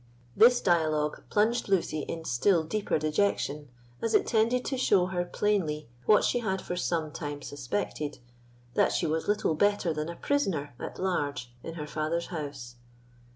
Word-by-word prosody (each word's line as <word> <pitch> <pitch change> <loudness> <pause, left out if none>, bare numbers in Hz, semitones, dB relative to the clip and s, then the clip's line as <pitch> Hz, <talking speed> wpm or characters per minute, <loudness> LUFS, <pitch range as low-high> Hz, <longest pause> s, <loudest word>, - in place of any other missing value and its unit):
This 245 +2 +6
dialogue 155 -4 +1
plunged 220 +2 +1
Lucy 175 -5 +1
in 165 +2 -5
still 160 +8 +3
deeper 200 +6 -1
dejection, 150 -2 0 0.3
as 225 -1 +1
it - - +4
tended 235 +3 +2
to 270 - -1
show 200 -8 +3
her 180 -1 -1
plainly 175 - -1 0.2
what 210 - +6
she 245 - +2
had 190 -5 -1
for 180 - -4
some 165 -3 -1
time 145 -2 -5
suspected, 130 +2 -3 0.6
that - - +3
she - - 0
was 160 +1 -1
little 210 -5 +1
better 205 0 +2
than 155 +1 -3
a 170 - -5
prisoner 185 - -1
at - - -6
large 145 -9 -2
in 165 - -7
her 150 -3 -5
father's 155 +3 -2
house. 140 -6 -6
165 Hz, 160 wpm, -29 LUFS, 150-205 Hz, 0.6 s, This